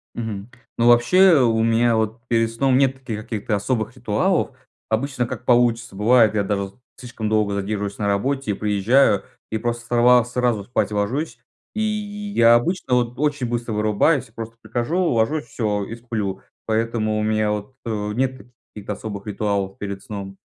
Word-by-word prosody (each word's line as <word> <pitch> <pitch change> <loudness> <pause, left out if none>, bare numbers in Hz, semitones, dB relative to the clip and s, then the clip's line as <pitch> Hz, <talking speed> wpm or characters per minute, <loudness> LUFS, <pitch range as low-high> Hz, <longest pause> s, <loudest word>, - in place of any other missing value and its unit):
Мгм, 110 -3 -5 0.3
ну, 120 - +3
вообще, 145 +8 +6
у 115 -3 +3
меня 115 0 +3
вот 110 +1 -1
перед 115 -1 +2
сном 130 +2 +2
нет 135 -1 +1
каких-то 110 -3 -3
особых 110 +2 -2
ритуалов. 130 - 0 0.3
Обычно 120 +2 -1
как 125 - -7
получится, 120 -3 +2
бывает, 110 +2 +4
я 100 - +1
даже 100 -1 -2 0.3
слишком 120 -4 -5
долго 105 -2 +1
задерживаюсь 100 0 -3
на 105 - -1
работе, 110 +3 0
приезжаю 105 +3 +2 0.3
и 110 - -1
просто 120 +1 -3
сорва 120 +1 +5
сразу 120 -3 0
спать 110 0 -1
ложусь, 120 +7 -2 0.3
и 215 - -2
я 205 - +2
обычно 130 +2 +1
вот 120 0 0
очень 145 -4 0
быстро 120 -1 -3
вырубаюсь. 110 +6 +2
Просто 115 0 -9
прихожу, 120 - -2
ложусь, 145 0 +1
всё, 105 -4 -2
и 115 - -7
сплю. 110 -5 -4 0.2
Поэтому 110 -1 0
у - - 0
меня 110 0 +1
вот, 105 +5 -4
э, 105 -3 -3
нет 130 +2 -2 0.3
каких-то 105 0 -5
особых 100 0 -7
ритуалов 100 -2 -2
перед 100 -1 -5
сном. 100 -2 -7
115 Hz, 160 wpm, -22 LUFS, 105-125 Hz, 0.3 s, вообще